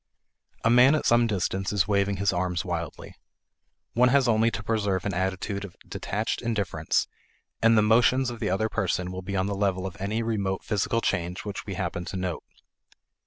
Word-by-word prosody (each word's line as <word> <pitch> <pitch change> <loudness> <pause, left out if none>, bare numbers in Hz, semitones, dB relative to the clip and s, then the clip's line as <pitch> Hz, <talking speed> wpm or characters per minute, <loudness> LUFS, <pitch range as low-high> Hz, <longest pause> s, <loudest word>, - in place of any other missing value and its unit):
A 115 - +3
man 125 +5 +6
at 155 - -1
some 120 0 +4
distance 95 -2 -1
is 100 -3 +1
waving 100 -1 +1
his 100 0 +1
arms 90 -1 -1
wildly. 85 -2 -5 0.8
One 125 +1 +4
has 135 0 +4
only 115 0 +3
to 105 -2 -5
preserve 100 -4 0
an 100 - -1
attitude 95 +2 -2
of 100 - -9
detached 105 +3 -3
indifference, 100 -9 0 0.5
and 115 0 +5
the 105 - +5
motions 120 +3 +3
of 120 - -8
the 110 - -1
other 95 +4 +1
person 90 -3 -1
will 95 0 -5
be 100 +2 -5
on 95 0 +1
the 100 - -2
level 95 -2 0
of 95 -2 -5
any 110 +4 -1
remote 100 -4 -1
physical 110 +2 0
change 90 0 -2
which 105 - -6
we - - -4
happen 85 - -3
to 95 - -5
note. 90 -2 -3
100 Hz, 190 wpm, -26 LUFS, 95-115 Hz, 0.8 s, man